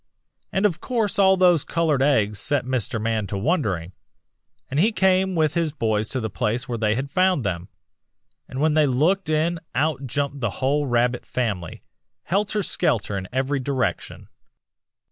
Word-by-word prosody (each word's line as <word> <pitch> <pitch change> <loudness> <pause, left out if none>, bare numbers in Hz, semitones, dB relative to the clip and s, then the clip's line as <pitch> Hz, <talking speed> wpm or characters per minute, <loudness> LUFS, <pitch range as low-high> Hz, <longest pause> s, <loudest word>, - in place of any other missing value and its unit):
"'And 190 +2 +1
of 185 -6 0
course 225 -6 -1
all 190 -1 +5
those 180 -5 +4
colored 160 -5 0
eggs 105 -8 +2
set 135 +2 0
Mr. 125 -3 -2
Man 110 -1 -1
to 100 - -4
wondering, 100 - -1 0.8
and 140 - -2
he 210 +7 +4
came 190 -2 +2
with 155 -2 +2
his 170 -3 0
boys 110 -6 -1
to 130 - -2
the 110 - -2
place 115 +5 -2
where 120 -2 -3
they 110 -1 +1
had 135 +3 -4
found 185 -4 +2
them; 90 -1 -3 0.8
and 130 - -6
when 155 +1 +2
they 155 -1 +4
looked 155 +8 +1
in 160 +2 +1 0.2
out 140 0 0
jumped 140 +2 -2
the 115 -4 0
whole 140 +2 +1
Rabbit 120 0 +1
family, 100 -9 -3 0.4
helter 205 +3 0
skelter 105 - 0
in 95 -1 -4
every 135 +2 0
direction." 130 -1 -3
140 Hz, 165 wpm, -23 LUFS, 115-170 Hz, 0.8 s, all